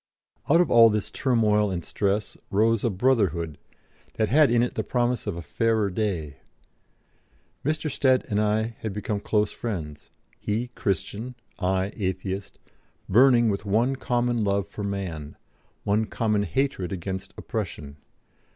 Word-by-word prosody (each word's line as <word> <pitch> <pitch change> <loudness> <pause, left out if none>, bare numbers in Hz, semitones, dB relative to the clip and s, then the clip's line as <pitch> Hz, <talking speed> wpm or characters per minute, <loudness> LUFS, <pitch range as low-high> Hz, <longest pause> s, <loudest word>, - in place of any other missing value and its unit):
Out 165 +4 +6
of 175 - +2
all 115 -1 +8
this 105 -2 -2
turmoil 105 -5 +2
and 90 -3 -4
stress 100 +1 -1
rose 110 +2 +2
a 120 - +2
Brotherhood 95 - +1 0.6
that 110 - +1
had 150 +2 +5
in 120 0 +3
it 125 - -2
the - - -2
promise 120 -2 0
of 95 -4 -2
a 85 - -6
fairer 110 0 +1
day. 90 -9 -2 1.3
Mr. 155 +2 -1
Stead 130 -2 +2
and 105 -2 +1
I 110 +2 0
had 110 -3 -4
become 105 0 -2
close 105 0 +1
friends 80 -10 -5 0.3
he 115 +4 -2
Christian, 110 +3 -3 0.2
I 95 +1 0
Atheist, 95 0 -3 0.5
burning 120 +3 +5
with 100 0 -2
one 115 +6 +1
common 120 -3 0
love 100 -1 0
for 105 - -7
man, 90 -7 -4 0.5
one 105 +2 +1
common 105 -2 0
hatred 95 - -1
against 95 +1 -5
oppression. 70 -1 -5
105 Hz, 140 wpm, -25 LUFS, 95-120 Hz, 1.3 s, all